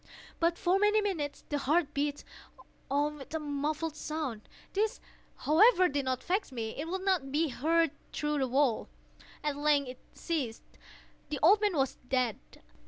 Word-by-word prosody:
But, 335 +1 +2
for 370 +2 +2
many 420 +1 +4
minutes, 345 -9 -2
the 290 - 0
heart 300 +2 +1
beat 285 0 -1 0.7
on 295 +2 0
with 285 +3 -8
a - - 0
muffled 300 +2 -2
sound. 300 -9 -4 0.2
This, 425 +2 0 0.4
however, 370 +4 +5
did 280 -3 -2
not 255 -1 -1
vex 385 -2 -1
me; 225 -3 -3
it 300 +3 -4
would 375 +2 -3
not 350 -9 +1
be 310 +2 +1
heard 325 +4 +2 0.2
through 295 -1 -1
the 265 - +1
wall. 260 -2 +1 0.5
At 295 -1 -1
length 290 -2 +2
it 255 - -9 0.2
ceased. 275 -10 -3 0.7
The 300 - -2
old 405 +6 +7
man 410 -6 +1
was 270 -1 0
dead. 250 -5 +1
300 Hz, 165 wpm, -31 LUFS, 275-340 Hz, 0.7 s, old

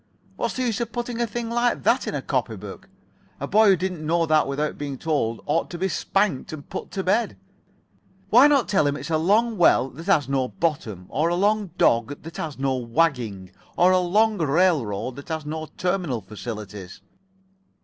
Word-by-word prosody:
What's - - -2
the 255 - -1
use 235 -3 -1
of 235 -1 -3
putting 240 0 -3
a 235 - +1
thing 230 +1 -4
like 240 +1 +1
that - - +2
in - - -2
a - - -3
copy - - -1
book? - - -10 0.5
A - - -3
boy 215 +1 +5
who 195 - +6
didn't 180 -2 -4
know 165 +2 +1
that 155 -2 +3
without 145 +2 -2
being 140 -2 -5
told 125 -7 -1
ought 155 +3 0
to 175 - -6
be 190 +2 0
spanked 195 -2 0
and 155 -2 -8
put - - -6
to 190 - -2
bed. 225 +6 +1 0.9
Why 250 +6 +8
not 285 -4 +3
tell 155 -7 +2
him 145 - 0
it's 165 - -7
a 155 - +2
long 215 +5 +2
well 135 -6 +4
that 165 +6 -11
has 150 -9 +3
no 135 -2 0
bottom, 120 - -3
or 155 +4 +1
a 175 - 0
long 205 +2 +1
dog 120 +4 +2
that 165 +2 -9
has 155 -3 -5
no 135 -1 0
wagging, 115 - -1 0.3
or 180 +1 +5
a 185 - +4
long 210 +4 +2
railroad 140 - +1
that 140 - -10
has 160 -2 -3
no 155 +1 -5
terminal 175 - -1
facilities?" 105 -4 -8
160 Hz, 200 wpm, -24 LUFS, 135-195 Hz, 0.9 s, Why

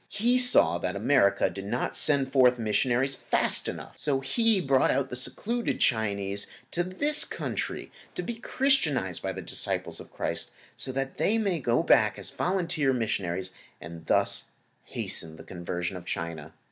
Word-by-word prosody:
He 240 +4 +2
saw 165 - +6
that 90 +2 -3
America 100 -2 +3
did 100 0 -7
not 120 +4 -2
send 140 -3 +3
forth 125 -2 +5
missionaries 120 +4 +1
fast - - +2
enough, - - -7
so 140 -3 +1
He 225 - +2
brought 135 -6 +2
out 135 0 0
the - - -3
secluded 230 - 0
Chinese 100 -4 0 0.2
to 175 - 0
this 285 +12 +1
country - - -4 0.2
to 180 - -3
be 235 - -3
Christianized 170 - 0
by - - -2
the - - -7
disciples - - -2
of - - -12
Christ, - - -4 0.2
so 130 - -4
that 135 +1 -4
they 220 - +2
may 200 -6 0
go 120 +2 +1
back 110 -10 +4
as 100 - -6
volunteer 170 -7 0
missionaries 95 -6 -2 0.3
and 80 0 -10
thus - - +1 0.4
hasten 80 -1 -6
the - - -12
conversion 90 +1 -5
of 90 -1 -9
China. 80 -3 -5
130 Hz, 160 wpm, -27 LUFS, -, 0.4 s, saw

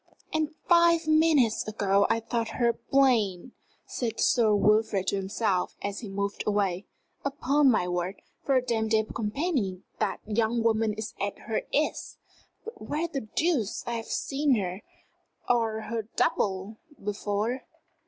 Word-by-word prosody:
"And 310 0 -1
five 340 -1 +5
minutes 310 -9 +3
ago 200 -2 +2
I 230 - +2
thought 230 0 -3
her 235 -1 +3
plain!" 235 -6 +1 0.3
said 230 -3 -3
Sir 220 -4 +4
Wilfrid 210 -1 +2
to - - 0
himself 195 -1 -1
as 200 0 -3
he 220 - -7
moved 200 +1 -3
away. 200 -3 0 0.4
"Upon 280 +1 +2
my 215 -7 +2
word, 180 +2 -3 0.2
for 275 - +1
a 255 - +3
dame 225 -3 0
de 220 0 +3
compagnie 215 - -2 0.2
that 215 -2 -1
young 225 +2 0
woman 220 -1 +2
is 220 -1 -5
at - - -2
her - - 0
ease! - - -1 0.5
But 455 - -9
where 315 +3 -2
the 290 -5 -4
deuce 295 - 0
have 235 - -4
I - - -14
seen 285 -1 +1
her, 190 -2 -3 0.7
or 225 -2 +1
her 225 -1 -4
double, 195 +2 0 0.3
before?" 210 +4 -2
220 Hz, 145 wpm, -27 LUFS, 205-265 Hz, 0.7 s, five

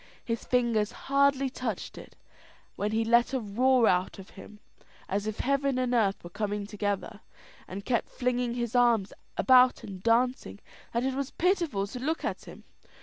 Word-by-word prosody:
His 230 -1 -3
fingers 235 -4 +1
hardly 275 0 +2
touched 250 -6 -5
it, - - -12 0.6
when 205 +1 -2
he 225 +1 0
let 235 +3 +3
a - - +1
roar 245 +3 +2
out 180 0 +1
of 195 -1 -12
him 210 +1 -13 0.5
as 200 +2 -2
if 215 - -3
heaven 275 0 +1
and 250 -1 0
earth 205 -5 +1
were 175 - -10
coming 205 +1 -3
together, 205 0 -3 0.5
and 195 +2 -7
kept 235 -3 0
flinging 245 -1 -1
his 240 -1 -3
arms 235 -5 +3 0.2
about 255 -1 +5
and 190 -2 -8
dancing, 230 - +1 0.3
that 235 +1 -1
it 265 0 0
was 275 0 -3
pitiful 340 - 0
to 235 +5 -8
look 310 +6 -2
at - - -4
him. - - -12
235 Hz, 170 wpm, -28 LUFS, 205-255 Hz, 0.6 s, about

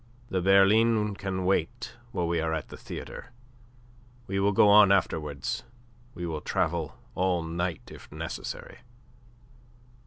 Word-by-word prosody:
The 95 - 0
berline 105 +3 +4
can 95 -2 -3
wait 95 +7 -1 0.2
while 90 -7 -1
we 85 -1 0
are 80 0 0
at 80 - -5
the - - -9
theatre. - - -8 1.0
We 95 -2 -2
will 100 +1 +3
go 105 - +5
on 100 -1 +7
afterwards. 75 -8 0 0.5
We 90 - -5
will 80 -3 -4
travel 80 0 -1 0.2
all 90 -2 +1
night 85 +1 -4
if - - -13
necessary." - - -6
95 Hz, 130 wpm, -28 LUFS, 80-100 Hz, 1.0 s, on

